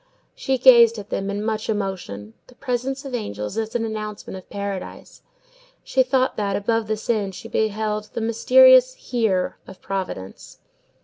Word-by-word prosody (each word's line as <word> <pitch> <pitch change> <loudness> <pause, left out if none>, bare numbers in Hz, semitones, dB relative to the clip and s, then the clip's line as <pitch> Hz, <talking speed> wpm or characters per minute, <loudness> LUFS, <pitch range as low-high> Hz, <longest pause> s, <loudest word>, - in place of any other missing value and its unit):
She 265 -1 -1
gazed 235 -3 +7
at 205 -1 -9
them 195 0 -2
in 205 +1 -3
much 220 -1 -2
emotion. 185 - -4
The 250 - -18
presence 265 +1 -3
of 270 - -7
angels 105 - -4
is 220 0 -3
an 230 -1 0
announcement 215 -2 -6
of 185 - -11
Paradise. 200 -2 -6 0.6
She 265 - +1
thought 260 0 +1
that, 200 -2 -1
above 225 +1 0
this 215 0 -4
inn, 210 -4 0
she - - -9
beheld 215 0 -1
the - - -1
mysterious - - +6
HERE 220 - -1
of 190 - -12
Providence. 185 - -6
220 Hz, 160 wpm, -22 LUFS, 200-245 Hz, 0.6 s, gazed